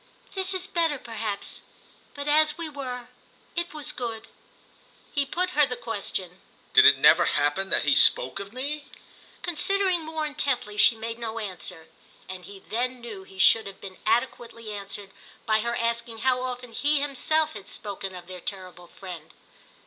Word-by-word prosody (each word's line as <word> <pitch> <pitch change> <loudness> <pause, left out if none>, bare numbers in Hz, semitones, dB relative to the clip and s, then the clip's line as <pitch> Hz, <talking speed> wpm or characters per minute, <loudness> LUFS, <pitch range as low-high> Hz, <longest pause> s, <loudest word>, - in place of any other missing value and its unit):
"This 380 0 0
is 370 0 +1
better 335 -6 +1
perhaps; 220 -4 -4 0.5
but 285 0 -5
as 305 +1 +4
we 335 -1 -3
were—it 275 +5 -6
was 300 -1 -1
good." 225 -4 -4 0.9
He 285 -2 +1
put 365 +4 -1
her 295 -4 +4
the 250 - -2
question. 195 -6 -4 0.3
"Did 430 0 +9
it - - +8
never - - +7
happen 145 +7 +1
that - - +3
he - - +4
spoke - - +4
of 200 0 -7
me?" 285 +4 -3 0.6
Considering 370 +1 +1
more 315 0 -3
intently 280 -8 -1
she 225 +2 +7
made 230 +1 -5
no 230 -1 -4
answer, 180 -5 -5 0.4
and 185 -1 -8
he 200 -1 -12
then 250 +3 -1
knew 215 -5 -8
he 190 - -15
should 220 +3 +6
have 195 - -9
been 190 -1 -10
adequately 230 -1 -1
answered 200 -1 -5 0.3
by 215 0 +3
her 235 +2 -1
asking 235 0 -1
how 255 -1 +3
often 250 -1 -5
he 290 +6 +2
himself 295 +3 +1
had 205 -2 -9
spoken 195 -2 -5
of 180 -1 -9
their 180 0 -8
terrible 185 -2 -6
friend. 175 -5 -10
235 Hz, 165 wpm, -26 LUFS, 200-295 Hz, 0.9 s, Did